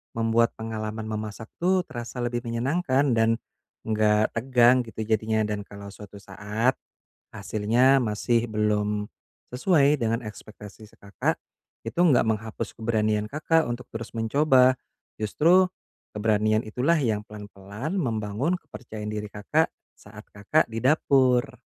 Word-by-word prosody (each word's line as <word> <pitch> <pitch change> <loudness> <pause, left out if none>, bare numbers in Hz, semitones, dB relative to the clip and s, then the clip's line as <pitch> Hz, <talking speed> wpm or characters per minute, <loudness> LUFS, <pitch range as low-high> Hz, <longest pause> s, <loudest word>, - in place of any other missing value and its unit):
membuat 115 +1 +2
pengalaman 110 -1 -5
memasak 110 0 -6
tuh 185 +1 +2
terasa 120 -4 -6
lebih 120 0 -1
menyenangkan 135 +3 +1
dan 115 -1 +3 0.5
nggak 110 -1 +2
tegang 125 +1 +4
gitu 110 0 -5
jadinya, 110 0 0
dan 105 -1 -3
kalau 100 0 -10
suatu 105 0 -12
saat, 105 +5 -1 0.6
hasilnya 115 +6 +2
masih 115 +2 0
belum 105 -1 0 0.5
sesuai 145 0 +3
dengan 115 0 +1
ekspektasi 105 0 -11
si 105 - -16
Kakak, 100 0 -2 0.5
itu - - -5
enggak 140 -9 +4
menghapus 110 0 -3
keberanian 110 -2 0
Kakak 160 +2 +2
untuk 120 +1 -6
terus 115 0 -7
mencoba. 130 +2 +3 0.4
Justru, 165 - +4 0.5
keberanian 110 0 +1
itulah 130 +10 +1
yang 110 -6 0
pelan-pelan 105 - -7
membangun 115 - -1
kepercayaan 110 - -9
diri 105 0 -4
Kakak, 105 -1 0 0.3
saat 105 +1 -14
Kakak 105 +10 +1
di 115 +1 -5
dapur. 130 -3 +2
110 Hz, 125 wpm, -25 LUFS, 105-125 Hz, 0.6 s, tegang